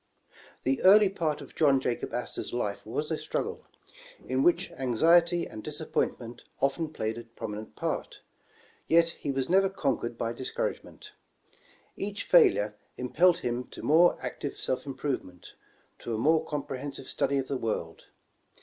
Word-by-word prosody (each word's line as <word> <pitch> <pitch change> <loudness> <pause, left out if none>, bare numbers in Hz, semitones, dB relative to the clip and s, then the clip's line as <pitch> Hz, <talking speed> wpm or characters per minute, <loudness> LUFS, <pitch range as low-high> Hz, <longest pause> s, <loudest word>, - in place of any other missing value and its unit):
THE 135 +1 +1
early 205 +1 +7
part 160 -6 -2
of 140 - -11
John 140 -4 +4
Jacob 125 -2 -2
Astor's 120 - -4
life 105 -4 -3
was 150 +8 -3
a 160 - -1
struggle, - - -4 0.6
in 130 +1 +1
which 175 +4 +2
anxiety 170 +7 +3
and 110 - -8
disappointment 120 +1 -3 0.2
often 150 +4 0
played 110 -6 -3
a 120 - -10
prominent 110 -2 -7
part, - - -3 0.7
yet 165 0 +5
he 150 - -6
was 135 -1 -1
never 195 +2 +4
conquered 130 -9 -2
by 115 0 -2
discouragement. 130 +2 -4 0.8
Each 205 +1 -3
failure 105 - +4 0.2
impelled 170 +8 +3
him 120 +1 -1
to - - -11
more 165 +4 +5
active 145 - -4
self 130 +2 -2
improvement, 130 -10 -5 0.5
to 115 - -4
a - - -2
more 155 +7 +3
compre 145 -3 -4
hensive 140 -1 -6
study 140 +1 0
of 135 -1 -1
the 140 - -2
world. 105 -9 -4
135 Hz, 150 wpm, -29 LUFS, 120-165 Hz, 0.8 s, early